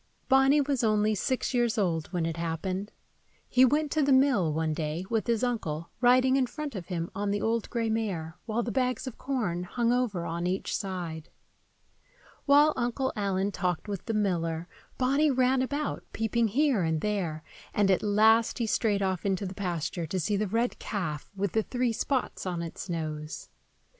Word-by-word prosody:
BONNY 270 +2 +5
was 275 -3 0
only 215 -1 +3
six 255 +6 -1
years 240 -2 +1
old 165 -6 0
when 175 -3 -2
it 165 0 -3
happened. 185 +4 -3 0.6
He 255 - +4
went 295 +3 +3
to 315 - +2
the 280 -1 +2
mill, 260 - +4
one 160 0 0
day, 155 +3 -3
with 225 0 0
his 235 0 +1
uncle, 170 -10 -2
riding 255 +2 +5
in 260 -2 +2
front 300 +1 -5
of 190 -5 -6
him 170 -2 -3
on 205 0 -2
the 205 +1 0
old 225 +1 -1
gray 230 -2 -1
mare, 195 -8 -2
while 230 +2 0
the 235 - -3
bags 255 +2 0
of 260 - -7
corn 225 -11 -1
hung 235 +6 0
over 220 -9 0
on 170 +1 -2
each 185 +2 -1
side. 175 -5 -4 1.2
While 295 +2 +6
Uncle 250 +2 -1
Allen 200 -1 0
talked 180 0 -2
with 200 -3 -4
the 225 - -1
miller, 170 -5 0 0.3
Bonny 275 +4 +3
ran 260 0 +3
about, 285 +3 -2
peeping 225 +1 +1
here 260 0 +2
and 160 -2 0
there; 180 -7 -2 0.3
and 200 -2 +3
at 185 - +3
last 220 +2 +4
he 235 - 0
strayed 210 -2 +1
off 185 -2 -1
into 195 0 0
the 185 - -5
pasture 175 -3 -3
to 185 +4 -2
see 205 +5 0
the 210 +1 0
red 230 +5 0
calf 165 -8 -4
with 195 -1 -1
the 220 - +2
three 245 +1 -1
spots 255 -4 -2
on 175 -2 -2
its 170 +3 -7
nose. 155 -2 -4
210 Hz, 185 wpm, -28 LUFS, 175-245 Hz, 1.2 s, While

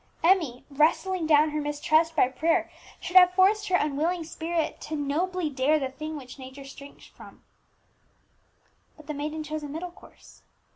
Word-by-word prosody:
Emmie, 330 -9 +2
wrestling 325 +4 +1
down 305 0 +4
her 300 0 -2
mistrust 310 +2 +1
by 285 - +4
prayer, 325 +6 0 0.3
should 360 - -7
have 360 -1 +7
forced 400 +3 +3
her 365 - +2
unwilling 320 +3 0
spirit 325 0 -3
to 310 - -5
"nobly 325 +5 -1
dare 285 +2 +1
the 270 -3 -2
thing 310 +3 -6
which 260 -1 -11
nature 265 +1 -10
shrinks 280 +1 -13
from." - - -16 1.5
But 310 - -15
the 305 - -5
maiden 305 +2 -4
chose 310 +1 -5
a 295 - -6
middle 335 +5 -6
course. - - -18
310 Hz, 160 wpm, -26 LUFS, 290-340 Hz, 1.5 s, have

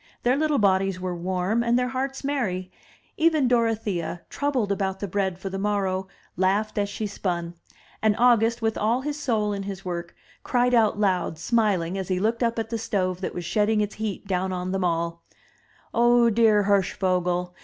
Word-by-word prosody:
Their 245 +2 +3
little 300 0 +1
bodies 195 -3 +2
were 180 -1 -3
warm, 185 +5 0
and 235 +1 +2
their 250 0 0
hearts 270 +1 -3
merry; 195 -10 -2 0.5
even 315 -4 +3
Dorothea, 220 -8 0
troubled 265 -8 0
about 190 -1 -1
the 200 - -3
bread 190 -1 -1
for 190 +1 -6
the 195 - -3
morrow, 195 -2 -1 0.3
laughed 200 +4 +1
as 200 0 0
she 215 +2 -4
spun; 175 -4 -3 0.5
and 215 -1 +3
August, 235 -1 +3
with 225 0 0
all 230 +4 +1
his 295 +2 -4
soul 215 -7 0
in 200 - -3
his 195 -1 -6
work, 175 -1 -5 0.3
cried 250 0 +1
out 220 -3 +3
loud, 185 -5 +1
smiling, 195 -2 +1
as 190 - -4
he 185 -1 0
looked 225 +4 0
up 230 -1 +1
at 225 0 -3
the 230 - -1
stove 185 -4 -1
that - - -4
was 175 - -4
shedding 210 +3 +1
its 210 0 -1
heat 215 -2 -4
down 190 -1 -1
on 180 0 -3
them 195 -1 -1
all: 170 -1 -1 0.7
"Oh, 240 0 +4
dear 215 -2 +4
Hirschvogel! 180 -2 +1
205 Hz, 185 wpm, -25 LUFS, 185-230 Hz, 0.7 s, Oh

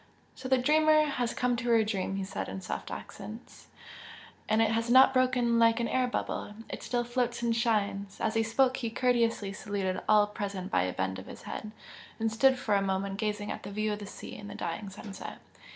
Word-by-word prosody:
"So 260 0 -7
the 260 - +5
dreamer 310 +3 +4
has 250 -5 -1
come 250 0 +1
to 235 +1 -2
her 230 -1 +5
dream!" 195 -3 -2
he 195 - -2
said, 190 - -4
in - - -5
soft 180 - -5
accents 215 +4 -9 0.8
"And 215 +1 +3
it 225 -1 +4
has 230 +1 0
not 260 +2 +7
broken 250 -2 +3
like 230 0 +5
an 235 - 0
air 255 +1 +1
bubble! 210 -3 -3
it - - -6
still 240 -1 -1
floats 240 0 -1
and 230 -1 +2
shines!" 200 -4 0
As 220 - 0
he 225 - +2
spoke 250 +4 +2
he 235 - -2
courteously 230 -4 +1
saluted 200 -3 -2
all 210 -1 +6
present 200 -2 -5
by 90 - +3
a 90 - -2
bend 95 0 -2
of 95 - -11
his - - -10
head, 215 - -6 0.5
and 225 0 0
stood 260 +4 +4
for 215 -4 -1
a 200 - +4
moment 195 0 -1
gazing 210 -1 -2
at - - -5
the - - -7
view 215 +1 -1
of 205 - -5
the 205 - -7
sea - - -9
and 205 0 -9
the - - -8
dying 195 +4 -4
sunset. 195 0 -8
220 Hz, 215 wpm, -30 LUFS, 200-245 Hz, 0.8 s, not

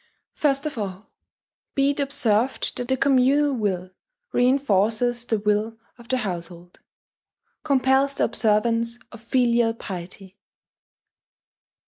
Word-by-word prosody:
First 280 -1 0
of 295 -6 -4
all, 195 0 -6 0.6
be 275 0 +3
it 285 - -6
observed 255 -3 0
that 245 - -4
the 265 +1 +1
communal 275 +2 +3
will 190 -6 -2 0.4
reinforces 240 -2 +1
the 225 - 0
will 210 +2 0 0.2
of 235 - -14
the 260 - +1
household, 175 -5 -6 0.8
compels 275 -1 +2
the - - 0
observance 230 +2 +1
of 235 - -12
filial 235 -1 +2
piety. 190 0 -9
235 Hz, 110 wpm, -23 LUFS, 210-265 Hz, 0.8 s, be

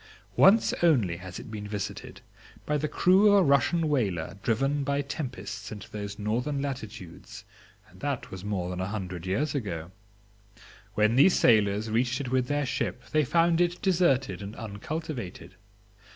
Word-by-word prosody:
Once 210 +3 +5
only 120 - +3
has 90 0 -8
it - - -9
been 105 -1 -6
visited, 100 -1 -6 0.4
by 150 - 0
the 150 +1 0
crew 185 +7 +4
of 205 - +6
a 195 - +6
Russian 155 +3 +3
whaler 100 - -1
driven 135 +6 0
by 140 +1 0
tempests 125 -8 -6
into 105 -3 -9
those 105 -1 -6
northern 120 +7 -1
latitudes, 115 -10 -7 0.4
and - - -19
that - - -3
was 95 0 -8
more 95 -4 -2
than 90 0 -4
a 95 - -2
hundred 95 -4 -5
years 135 +10 0
ago. 90 - -4 1.0
When 105 +3 +3
these 175 +7 +6
sailors, 105 -1 +3
reached 120 +2 +1
it 130 -3 -4
with 130 -1 +1
their 145 0 0
ship 125 0 -3
they 155 -1 +3
found 165 +4 +3
it 175 0 +1
deserted 140 - +2
and 100 +2 -7
uncultivated. 115 - -6
120 Hz, 160 wpm, -28 LUFS, 100-145 Hz, 1.0 s, of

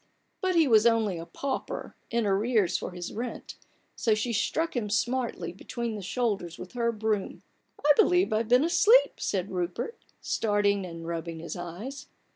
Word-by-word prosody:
But 370 -2 +1
he 325 -3 +5
was 225 -2 +6
only 220 -6 +2
a 165 - -8
pauper, 275 +10 -4
in 235 -1 0
arrears 200 -1 +2
for - - -2
his 180 -1 -6
rent, 240 +3 -5 0.4
so 220 -2 +2
she 230 +3 -1
struck 320 +10 0
him 220 -4 -1
smartly 230 -6 -1
between 235 +4 -4
the 210 - -5
shoulders 195 -5 -2
with 180 - -9
her 235 -1 0
broom, 215 -2 -2 0.2
" - - -16
I 295 - +7
believe 360 - +4
I've 220 +1 0
been 250 +3 +5
asleep/' 440 +9 +5
said 190 0 -2
Rupert, 180 - -3 0.2
starting 205 -3 +1
and 165 -1 -8
rubbing 165 0 -4
his 170 - -6
eyes. 180 +11 -7
215 Hz, 170 wpm, -28 LUFS, 185-245 Hz, 0.4 s, I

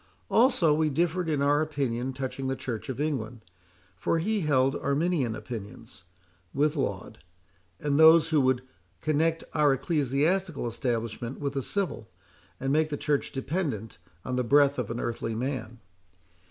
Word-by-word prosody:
Also 225 - +4
we 155 0 +2
differed 170 +3 0
in 145 -3 +1
our 145 +1 +3
opinions 135 -4 -2
touching 135 0 -3
the 135 - -1
Church 125 0 -5
of 130 - -4
England, 125 -7 -2 0.5
for 95 - 0
he 210 +6 0
held 135 -5 +2
Arminian 140 -4 0
opinions, 105 -7 -9 0.5
with 150 +2 +2
Laud, 100 - -3 0.6
and 145 0 0
those 160 0 +7
who 155 -3 +3
would 130 -1 +2 0.4
connect 160 +2 +1
our 150 -3 +4
ecclesiastical 150 +4 0
establishment 115 0 -3
with 140 -1 -2
the 135 - -1
civil, 175 - -3 0.5
and 135 +1 0
make 155 +1 +2
the 145 - -3
Church 145 -1 -1
dependent 135 - -3 0.3
on 125 0 -2
the 125 - +1
breath 140 +2 +4
of 120 - -3
an 115 +1 -3
earthly 115 -1 -3
man. 120 -1 -4
140 Hz, 150 wpm, -28 LUFS, 125-155 Hz, 0.6 s, those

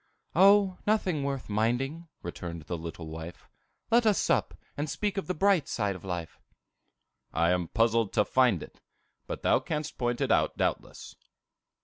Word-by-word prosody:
"O, 195 +1 +5
nothing 185 -8 +1
worth 140 -2 -3
minding," 125 +10 -1 0.2
returned 85 -1 -6
the 85 - -4
little 80 0 -7
wife. 80 +2 -8 0.4
"Let 235 0 +5
us 210 - +4
sup, - - +1 0.2
and 145 +1 -3
speak 205 +6 -2
of 195 - -3
the 185 - -1
bright 190 -3 +3
side 100 -3 -1
of 90 - -11
life." 90 -3 -5 0.9
"I 85 +1 +2
am 90 -1 0
puzzled 115 0 +2
to 105 -2 +3
find 125 - +3
it; - - -14 0.5
but - - -5
thou - - +4
canst 150 -1 -4
point 120 -1 0
it - - 0
out - - +2
doubtless." - - -3
120 Hz, 160 wpm, -29 LUFS, -, 0.9 s, O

